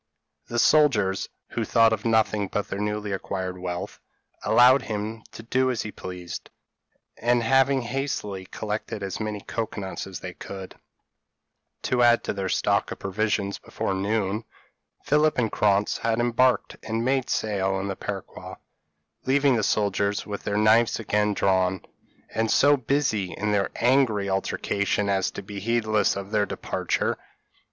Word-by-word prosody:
The 120 - -4
soldiers, 120 -10 +3 0.2
who - - -2
thought 115 -1 +4
of 110 - -4
nothing 110 -2 +2
but 105 +2 -3
their 100 - -4
newly 105 0 -2
acquired 95 -1 -4
wealth, 90 -1 -5 0.4
allowed 125 +5 +6
him 110 +1 -4
to 110 - -9
do 130 +3 +1
as 125 -3 -1
he 110 - -6
pleased; 90 -2 -7 0.7
and, 120 0 +2
having 135 +2 +3
hastily 120 -7 -3
collected 105 0 -4
as 95 -1 -4
many 105 -2 -3
cocoa 110 0 -4
nuts 95 0 -5
as 95 -4 -7
they 90 -1 -6
could, 95 +1 -8 1.1
to 125 -1 +1
add 120 -1 +5
to - - -2
their 95 -2 -3
stock - - +1
of - - -6
provisions, 100 0 -1
before - - -3
noon, 100 +2 -1 0.6
Philip 150 +1 +2
and 115 -4 +1
Krantz 100 0 +2
had 115 0 0
embarked 120 +1 +2
and 110 +1 -2
made 130 0 +1
sail 95 -2 0
in 100 - -3
the 100 - -3
peroqua, 100 -1 -7 0.7
leaving 135 0 +3
the 115 - +1
soldiers 100 -1 0
with 105 -1 -5
their 100 - 0
knives 110 +3 +4
again 105 -1 +1
drawn, 95 -1 +1 0.5
and 110 0 0
so 145 +5 +5
busy 120 - 0
in 105 +5 -2
their 100 -1 +1
angry 120 -5 +2
altercation 100 +1 -1
as 95 -1 +1
to - - -8
be 100 +1 -7
heedless 110 0 +1
of 100 +1 -6
their 105 -2 +2
departure. - - -2
105 Hz, 155 wpm, -25 LUFS, 100-120 Hz, 1.1 s, allowed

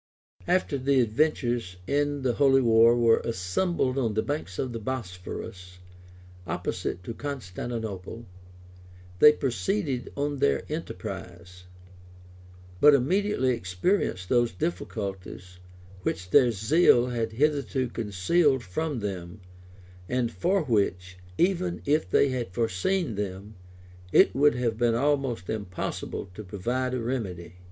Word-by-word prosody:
} - - -25
After 145 -6 -4
the 135 +1 +2
adventurers 120 - 0
in 145 +1 0
the 125 -2 +1
holy 135 0 +4
war 115 0 +5
were 115 -1 +4
assembled 130 - -1
on 115 -5 -1
the 110 - +1
banks 145 -10 -4
of 130 -2 -2
the 115 - -4
Bosphorus, 90 -5 -6 0.7
opposite 90 +1 -3
to 115 - -5
Constantinople, 115 -4 -6 0.9
they 150 - +9
proceeded 135 - -2
on 145 0 -1
their 70 - +1
enterprise; 90 +1 -7 1.1
but 150 -1 +7
immediately 155 0 +1
experienced 95 - -1
those 120 +3 +2
difficulties 90 0 -5 0.4
which 90 0 -3
their 130 -4 +6
zeal 120 - +4
had 115 -2 -2
hitherto 140 0 0
concealed 120 - +1
from 135 - -3
them, 95 -2 -5 0.7
and 125 -2 0
for 185 +1 +1
which, 95 -7 -1 0.2
even 180 -1 +1
if 145 -9 +1
they 140 - +4
had 125 -5 -3
foreseen 115 - 0
them, 100 +1 -5 0.6
it - - +5
would 145 +2 +4
have 115 -2 -1
been 120 -1 +3
almost 135 -6 0
impossible 100 -2 -4
to 105 - -8
provide 120 +7 -2
a - - -2
remedy. 95 -8 -4
120 Hz, 120 wpm, -27 LUFS, 95-140 Hz, 1.1 s, they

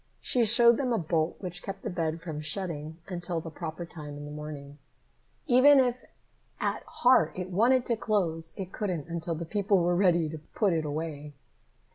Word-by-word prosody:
She 245 -2 +3
showed 235 +1 +7
them 260 -3 -1
a 230 - +2
bolt 160 -2 0
which 180 -2 -5
kept 195 0 -7
the - - -3
bed 165 -2 -2
from 160 -3 -6
shutting 155 -1 -5
until 175 -2 -3
the 165 0 -8
proper 160 +2 -6
time 150 -3 -9
in 145 - -8
the 145 - -8
morning. 150 -1 -8 0.7
Even 275 +1 +6
if 250 -1 +1 0.6
at - - -1
heart 245 -12 +3
it 185 0 -5
wanted 240 +7 +3
to 235 - +1
close, 170 -7 -1
it 190 -1 -6
couldn't 180 -8 -3
until 170 0 -3
the 170 +2 -5
people 200 +2 +1
were 175 0 +2
ready 175 -3 +3
to 160 0 -7 0.2
put 200 -5 +2
it 160 -2 -1
away. 150 -1 -5
175 Hz, 185 wpm, -28 LUFS, 155-205 Hz, 0.7 s, showed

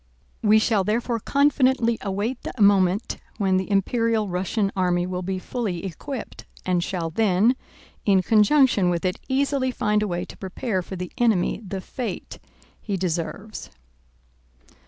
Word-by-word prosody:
We 215 0 +5
shall 215 -2 +2
therefore 230 +3 0
confidently 260 -3 +2
await 205 +6 -2
the - - -7
moment 200 0 +3 0.2
when 190 -3 +2
the 190 +1 -2
Imperial 220 +2 +1
Russian 195 +3 -1
army 180 -2 +1
will 180 0 -3
be 190 +1 -2
fully 195 -3 -3
equipped, 235 - -6 0.2
and 180 -2 +1
shall 170 -3 -3
then, 215 +5 +3 0.5
in 195 -2 +3
conjunction 215 -2 +4
with 175 +1 -1
it, 185 - -1
easily 270 0 +1
find 210 -4 +1
a 210 - 0
way 175 -1 -2
to - - -12
prepare 190 +1 -3
for 190 - -7
the 180 -1 -6
enemy 220 -4 +2
the 195 -1 -5
fate 245 +4 -6 0.4
he 200 -3 -2
deserves. 185 +4 -4
200 Hz, 145 wpm, -24 LUFS, 185-230 Hz, 0.5 s, We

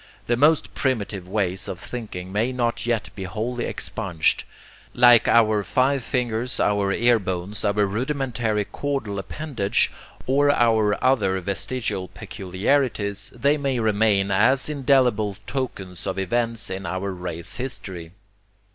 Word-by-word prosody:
The 120 - +2
most 150 +5 +3
primitive 105 -8 -2
ways 95 -2 -1
of 90 - -5
thinking 95 -7 -6
may 110 +5 0
not 120 -2 -1
yet 115 -3 -1
be 95 - -6
wholly 115 +6 -3
expunged. 85 -8 -1 0.5
Like 120 -1 +7
our 110 -2 +4
five 130 +4 +1
fingers, 120 0 -1
our 100 -1 +2
ear 120 +3 +4
bones, 95 +2 -4
our 105 0 +2
rudimentary 115 -1 -1
caudal 135 -9 -3
appendage, 120 -2 -1 0.3
or 140 +2 +3
our 110 -5 +3
other 105 -8 +2
'vestigial' 100 +1 -3
peculiarities, 100 +2 -1
they 140 +5 +2
may 135 -3 -1
remain 105 -2 +2
as 130 +9 +3
indelible 125 -8 +2
tokens 95 -10 -5
of - - -2
events 115 +2 -1
in 95 0 -4
our 95 +3 -2
race 90 -2 -5
history. 95 -10 -6
110 Hz, 130 wpm, -23 LUFS, 95-125 Hz, 0.5 s, Like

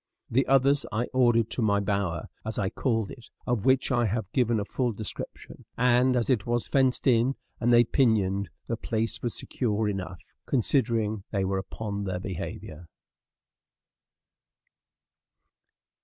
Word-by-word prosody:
The 130 +4 +2
others 135 +1 +4
I 110 +3 0
ordered 120 -3 +3
to - - -2
my 100 -2 +3
bower, 100 -4 -1 0.2
as 110 0 -4
I 95 -2 0
called 115 -6 -1
it, 120 - -12 0.2
of 120 -5 -1
which 130 +1 +3
I 120 -2 +2
have 110 -1 -3
given 120 -3 +2
a 100 - -2
full 125 +2 -1
description; 105 0 -7
and 125 +1 +3
as 120 -2 +1
it 120 -6 +1
was 120 0 0
fenced 130 -2 +2
in, 125 +1 +3 0.2
and 120 +1 +2
they 120 0 +7
pinioned, 100 - +1 0.2
the 115 - -3
place 115 -1 -2
was 120 - -1
secure 110 -3 -1
enough, 95 -3 -4 0.2
considering 115 -5 +1
they 100 -2 -1
were 95 0 0
upon 100 +1 -5
their 95 -2 -2
behavior. 85 -3 -6
115 Hz, 145 wpm, -27 LUFS, 100-125 Hz, 0.2 s, they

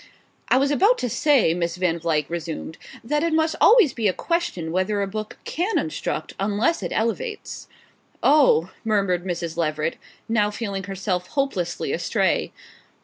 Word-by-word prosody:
"I - - +5
was 275 +2 +2
about 405 - +4
to 245 - -2
say," 270 - +3
Miss 170 -1 -2
Van 180 -2 0
Vluyck 155 -3 0
resumed, 165 -1 -5 0.2
"that 295 +6 0
it 335 -1 0
must 320 0 +2
always 435 - +6
be 225 -3 0
a 185 - +2
question 335 - -2
whether 185 +4 0
a 200 - 0
book 215 +2 -6
can 370 +7 -1
instruct - - -3
unless 210 +11 +1
it - - -4
elevates." 425 - -3 0.6
"Oh 275 - +4
" - - -32
murmured 195 -5 +1
Mrs. 170 -2 -4
Leveret, 155 -1 -1 0.3
now 215 -2 +2
feeling 200 -3 -4
herself 190 -2 -3
hopelessly 270 - -2
astray. - - 0
205 Hz, 155 wpm, -23 LUFS, 175-280 Hz, 0.6 s, always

